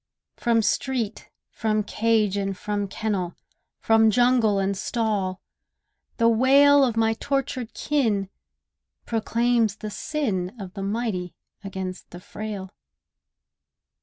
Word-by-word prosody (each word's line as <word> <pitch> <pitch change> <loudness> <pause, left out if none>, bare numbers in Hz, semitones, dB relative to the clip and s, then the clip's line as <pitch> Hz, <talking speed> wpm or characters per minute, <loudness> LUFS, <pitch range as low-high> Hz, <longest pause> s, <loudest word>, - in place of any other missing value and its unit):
From 230 -2 +2
street, 235 -4 -1 0.2
from 215 -1 0
cage, 215 -1 +1
and 195 -1 -2
from 205 0 -2
kennel, 190 -3 -2 0.4
From 225 0 +4
jungle 240 -2 +3
and 195 0 0
stall, 200 -4 -1 0.8
the 230 - +4
wail 275 +5 +6
Of 240 -4 0
my 225 0 +3
tortured 255 -2 -3
kin 220 -10 0 0.8
proclaims 230 -1 +1
the 215 -1 -7
sin 205 -10 -2
Of 190 -2 -8
the 200 - -6
mighty 200 -3 -2 0.3
against 190 -2 -6
the 175 - -10
frail. 200 0 -7
220 Hz, 110 wpm, -24 LUFS, 195-235 Hz, 0.8 s, wail